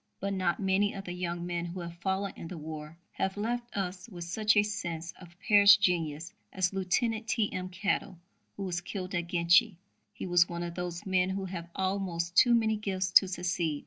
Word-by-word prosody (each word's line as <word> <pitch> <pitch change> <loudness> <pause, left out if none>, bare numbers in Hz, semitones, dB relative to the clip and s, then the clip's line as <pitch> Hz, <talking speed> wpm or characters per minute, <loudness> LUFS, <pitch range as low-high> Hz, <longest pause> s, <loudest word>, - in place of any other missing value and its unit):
But 200 +1 -2
not 185 -3 0
many 195 +1 +2
of 195 - -6
the 180 - -6
young 175 -1 -3
men 175 -1 -2
who 175 +1 -5
have 170 -1 -6
fallen 190 +2 -2
in - - -8
the 175 - -7
war 155 0 -8
have 190 +1 -2
left 240 +2 -3
us 185 +1 -4
with 175 -4 -7
such 210 +5 +1
a 205 - +6
sense 170 -5 -4
of 175 -1 -14
perished 205 -1 +8
genius 165 -4 0 0.2
as 185 0 0
Lieutenant 220 +4 0
T.M. 200 -3 -1
Kettle, 190 -1 -2 0.4
who 200 - -4
was 175 -2 -2
killed 185 0 -6
at 175 -2 -1
Ginchy. 175 +5 +4 0.4
He - - -7
was 175 -1 +4
one 170 0 -4
of 170 0 -5
those 175 -1 -5
men 185 -1 +2
who 190 0 -3
have 175 -2 -6
almost 185 -3 -2
too 240 +3 +6
many 220 -2 +2
gifts 190 -3 -2
to 190 - +7
succeed. 175 -4 -1
185 Hz, 200 wpm, -30 LUFS, 175-200 Hz, 0.4 s, perished